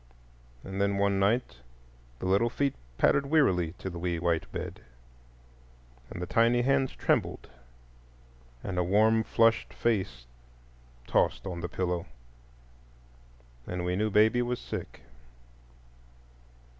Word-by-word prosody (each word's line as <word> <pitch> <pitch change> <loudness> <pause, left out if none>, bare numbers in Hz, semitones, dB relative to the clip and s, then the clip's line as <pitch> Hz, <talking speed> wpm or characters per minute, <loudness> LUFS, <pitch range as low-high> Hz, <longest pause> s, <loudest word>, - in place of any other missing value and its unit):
And 95 +1 -4
then 100 0 +1
one 100 0 +2
night 105 - +1 0.6
the - - -6
little 100 +5 +3
feet 140 +2 0 0.2
pattered 140 0 +3
wearily 95 - +2
to 95 - -8
the 85 -2 -5
wee 85 0 -1
white 85 -1 -1
bed, - - -6 1.3
and - - -7
the 90 - -3
tiny 115 +4 +3
hands 135 0 +2
trembled; - - 0 1.2
and 90 -2 -3
a - - +2
warm 110 +5 +3
flushed 115 +1 +2
face 95 - -1 0.8
tossed - - +1
on 90 -3 -5
the 90 - -4
pillow, 90 -2 -2 1.6
and 90 0 -3
we 90 0 0
knew 105 +3 0
baby 110 +4 +4
was 120 0 -1
sick. - - -7
100 Hz, 120 wpm, -29 LUFS, 90-115 Hz, 1.6 s, baby